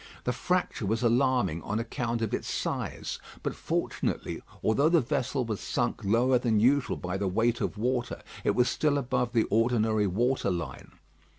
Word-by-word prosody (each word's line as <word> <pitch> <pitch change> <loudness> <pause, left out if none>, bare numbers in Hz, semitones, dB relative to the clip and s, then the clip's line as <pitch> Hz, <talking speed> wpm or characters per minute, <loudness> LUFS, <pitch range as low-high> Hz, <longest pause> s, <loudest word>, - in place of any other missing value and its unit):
The 125 - 0
fracture 180 - -1
was 110 +3 0
alarming 120 - +2
on 105 - -2
account 115 0 -2
of 110 - -2
its - - -2
size; - - -3 0.2
but - - -1
fortunately, - - -2 0.2
although 140 +8 +3
the 170 0 +5
vessel 130 0 -1
was 110 -3 -3
sunk - - -1
lower 120 +5 +3
than 115 -3 +2
usual 130 +5 +3
by 90 +2 -3
the 100 0 -1
weight 115 +5 +1
of - - -2
water, 120 +2 -1 0.2
it - - +2
was 125 0 +4
still 150 -2 +1
above 125 -2 -1
the 115 -2 +3
ordinary 110 -2 +2
water 120 +5 +1
line. 90 -2 -5
120 Hz, 170 wpm, -28 LUFS, 110-125 Hz, 0.2 s, the